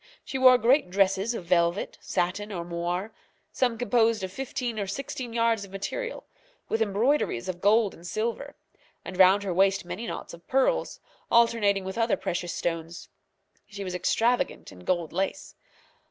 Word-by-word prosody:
She 265 - -4
wore 255 -1 +8
great 250 -1 +3
dresses 195 +4 +1
of 180 - -6
velvet, 170 +1 +1
satin, 190 +4 -2
or 175 -3 -4
moire, 175 +4 -3 0.4
some 245 -3 0
composed 230 -3 +2
of 190 - -4
fifteen 245 -3 -3
or 200 - -2
sixteen 250 +3 -5
yards 230 -2 +1
of 200 - -10
material, 470 - -5 0.5
with 225 - 0
embroideries 220 - +1
of 180 -1 -5
gold 210 0 +4
and 170 +2 -11
silver; 235 +8 -3 0.5
and 185 - -6
round 190 +2 +6
her 190 -3 -2
waist 195 +1 +2
many 180 +7 -5
knots - - -6
of 170 0 -14
pearls, 270 - +1 0.3
alternating 230 -4 +3
with 190 +4 -5
other 230 0 +2
precious 175 0 -3
stones. 165 0 -4 0.6
She 205 -1 -7
was 185 -1 -5
extravagant 230 +7 0
in 90 - -13
gold 170 -3 -1
lace. 195 +10 -3
200 Hz, 160 wpm, -27 LUFS, 180-235 Hz, 0.6 s, wore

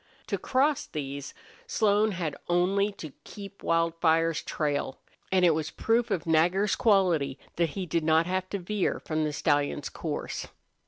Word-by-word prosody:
To - - -2
cross 275 +2 +1
these 140 -1 -6 0.3
Slone 210 0 +2
had 165 -5 -3
only 195 +4 +2
to 155 -7 -9
keep 200 -1 -10
Wildfire's 165 -1 +2
trail. 145 -3 -2 0.3
And 185 -1 +4
it 170 - +5
was 160 0 -2
proof 230 +6 +1
of 175 - -1
Nagger's 175 +5 +3
quality 180 - +2 0.2
that 170 -1 +2
he 190 - -2
did 170 -1 -1
not 160 +1 +4
have 185 +1 -2
to 200 - -2
veer 195 +1 -1
from 155 -1 -1
the 150 - -1
stallion's 145 -1 0
course. 155 -3 -4
170 Hz, 155 wpm, -28 LUFS, 155-195 Hz, 0.3 s, it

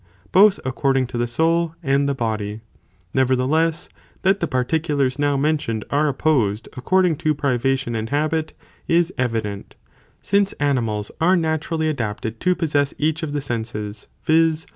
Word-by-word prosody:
both 200 +1 +6
according 135 0 +1
to 125 - -9
the 120 0 0
soul 165 +6 +1
and 140 0 +2
the 140 - 0
body. 110 -3 -3 0.5
Nevertheless, 140 +6 +1 0.4
that 195 +1 +3
the 170 - -1
particulars 140 0 0
now 145 -1 +2
mentioned, 140 -7 -1
are 150 +2 +2
opposed 130 -7 +1
according 180 +5 +2
to 155 0 0
privation 135 -2 0
and 110 0 -3
habit, 155 +3 -1 0.3
is 170 +1 +2
evident, 110 -5 -2 0.4
since 200 0 +1
animals 115 -8 -1
are 180 +3 +5
naturally 160 0 -1
adapted 115 -5 -3
to 180 0 +2
possess 145 -4 0
each 155 +2 0
of 160 -3 -3
the 145 0 -2
senses, 110 -4 -5 0.2
viz. 160 0 +2
140 Hz, 140 wpm, -21 LUFS, 120-160 Hz, 0.5 s, both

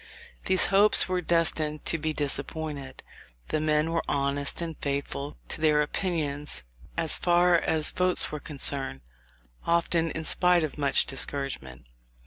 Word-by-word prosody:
These 185 0 +5
hopes 205 +2 +5
were 185 -1 -1
destined 160 -3 0
to 165 - 0
be 155 +1 -2
disappointed. 145 -1 -4 0.5
The 155 - -1
men 155 +1 +1
were 165 - 0
honest, 140 0 -1
and 165 -2 -4
faithful 140 0 -4
to - - -5
their 150 -1 +3
opinions, 150 - -3 0.3
as 165 -2 0
far 175 0 +3
as 155 -2 +1
votes 180 0 +3
were 150 - -5
concerned; 140 - -1 0.6
often 170 0 +1
in 160 +1 -5
spite 180 +1 +3
of 155 - -4
much 140 -2 +2
discouragement. 135 - -4
155 Hz, 135 wpm, -26 LUFS, 140-170 Hz, 0.6 s, These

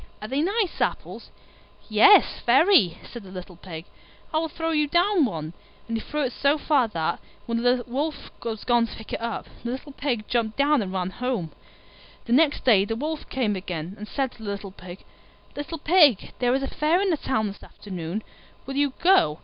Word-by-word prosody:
Are 215 - -6
they 270 +5 0
nice 395 +2 0
apples?" - - -3 0.6
"Yes, 220 - +6
very," 250 - +5
said 240 - -9
the 195 - -13
little 185 -1 -9
Pig; 165 -2 -9 0.5
"I 310 - +3
will 325 0 -2
throw 325 +1 -3
you 300 -2 +2
down 345 +1 +3
one." 160 -7 -4 0.3
And 230 - -3
he 225 - -2
threw 300 0 -2
it 255 -2 -2
so 280 +2 +2
far 285 -5 +2
that, 165 -7 -2 0.3
while 230 0 -1
the 245 0 +2
Wolf 285 +5 -3
was 225 -2 -4
gone 240 -1 +3
to - - -9
pick 220 - -10
it - - -3
up, 230 0 -3 0.2
the 235 - -3
little 265 +4 -6
Pig 255 -6 -2
jumped 225 -3 -1
down 285 -1 +3
and 190 -3 -4
ran 185 -1 -2
home. 235 -9 -3 0.7
The 235 - 0
next 295 +2 +3
day 215 -6 +6
the 225 +3 -3
Wolf 305 +5 -4
came 230 -6 0
again, 180 -2 -5
and 210 0 -9
said 270 0 -2
to - - -18
the 210 - -5
little 200 -1 -5
Pig, 185 0 -11 0.5
"Little 290 +3 -5
Pig, 300 - +4
there 245 0 +2
is 270 - -1
a - - -1
Fair 310 +6 +1
in 395 -1 +1
the 320 - +1
Town 220 -6 -1
this 200 -1 -6
afternoon: 185 +1 -6 0.4
will 270 - -5
you 285 -2 +2
go?" 340 - +5
245 Hz, 205 wpm, -25 LUFS, 205-295 Hz, 0.7 s, Yes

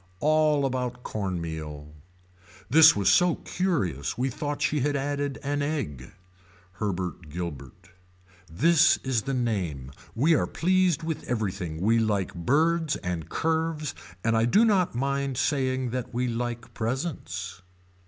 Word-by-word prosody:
All 155 0 +3
about 125 -1 -3
corn 95 -4 -3
meal. 75 -2 -6 0.7
This 155 +7 +8
was 100 -2 0
so 175 - +5
curious 120 - -2
we 130 +2 0
thought 145 +3 -3
she 150 - +1
had 145 +2 0
added 140 0 -2
an 145 +1 -1
egg. 125 - -3 0.6
Herbert 90 -4 -4
Guilbert. 75 -3 -7 0.6
This 165 - +4
is 130 -4 0
the 135 +4 -3
name. 90 - -2 0.2
We 150 +8 +3
are - - +2
pleased 180 -2 +1
with 160 -1 -3
everything. 95 -8 -2
We 115 +4 +3
like 105 -4 0
birds 155 - +1
and 85 -3 -4
curves 160 -2 -1 0.3
and 115 0 +2
I 115 0 +3
do 205 - +4
not 190 - +2
mind 140 0 -1
saying 130 -3 0
that 125 -1 -4
we 125 +1 0
like 120 0 -4
presents. 110 - -4
125 Hz, 135 wpm, -26 LUFS, 95-150 Hz, 0.7 s, This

